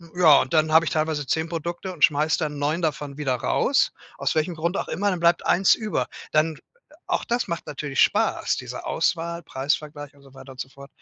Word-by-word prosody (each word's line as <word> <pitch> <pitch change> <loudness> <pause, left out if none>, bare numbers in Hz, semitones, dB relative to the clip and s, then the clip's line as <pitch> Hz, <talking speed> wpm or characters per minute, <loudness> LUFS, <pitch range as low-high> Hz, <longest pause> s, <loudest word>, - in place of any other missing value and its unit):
ja, 160 -5 +6
und 130 - -5
dann 155 0 +3
habe 160 - +7
ich - - -2
teilweise 155 -2 -1
10 160 +5 0
Produkte 170 +3 -4
und 150 -5 -4
schmeiße 150 +1 0
dann 150 -2 -3
9 150 +4 -1
davon 145 -2 -3
wieder 135 -4 0
raus 125 - +1 0.3
aus - - -1
welchem 160 +2 0
Grund 170 +4 -2
auch - - -3
immer, 205 +1 0
dann 180 - -2
bleibt 170 0 +3
1 190 +2 +4
über. 215 -2 -2 0.2
Dann 155 0 +2 0.5
auch 360 - -1
das 240 -1 -1
macht 170 -2 -4
natürlich 145 -1 -4
Spaß - - +2
diese - - -7
Auswahl, 170 0 -1
Preisvergleich 145 +1 -3
und 140 - -21
so 135 -1 -18
weiter 135 0 -12
und 130 - -18
so 130 - -7
fort. 140 +1 -13
155 Hz, 210 wpm, -24 LUFS, 145-170 Hz, 0.5 s, habe